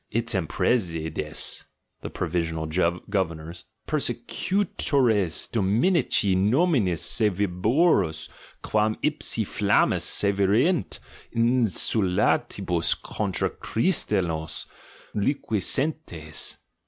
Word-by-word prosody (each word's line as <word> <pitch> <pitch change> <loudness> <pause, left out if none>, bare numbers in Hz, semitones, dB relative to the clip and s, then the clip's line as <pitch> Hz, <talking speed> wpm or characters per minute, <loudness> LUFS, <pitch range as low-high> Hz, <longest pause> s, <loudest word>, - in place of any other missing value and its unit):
Item 110 -7 -1
presides" 80 -10 -1 0.4
(the - - -6
provisional 80 -2 -2
governors) 85 0 -2 0.2
"persecutores 125 - 0
dom 105 -1 +1
inici 170 - +2
notninis 105 - +2
sevvioribus 100 - +1 0.4
quam 110 0 +1
ipsi 145 -7 0
flammis 100 +1 +1
sccvierunt 100 - +1 0.4
in 120 +1 +2
sultantibus 90 -4 +1
contra 100 -4 -2
CJtristianos 95 - -1 0.5
liquescentcs! 110 - 0
100 Hz, 70 wpm, -25 LUFS, 85-120 Hz, 0.5 s, inici